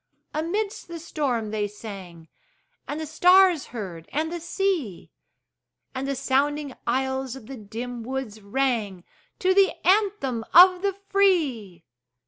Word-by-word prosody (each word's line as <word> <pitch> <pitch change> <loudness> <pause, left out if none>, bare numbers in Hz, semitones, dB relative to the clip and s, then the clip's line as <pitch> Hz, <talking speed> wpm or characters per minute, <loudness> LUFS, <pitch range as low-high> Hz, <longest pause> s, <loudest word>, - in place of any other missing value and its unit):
Amidst 395 +8 -2
the 340 0 -7
storm 270 -9 -2
they 210 -1 -1
sang, 195 -6 -10 0.6
And 295 - -4
the 315 - -4
stars 360 +1 +4
heard, 180 -8 -7
and 315 +2 -1
the 345 - -4
sea; 340 - -2 0.8
And 265 +1 -4
the 275 - -1
sounding 285 +2 0
aisles 265 +1 -1
of 265 - -11
the 270 - -8
dim 230 +3 -6
woods 235 -3 -5
rang 210 -4 -1 0.3
To 375 0 +2
the 390 0 +4
anthem 375 - +2
of 365 +1 +8
the 400 0 0 0.2
free! 275 - +1
270 Hz, 130 wpm, -25 LUFS, 220-345 Hz, 0.8 s, of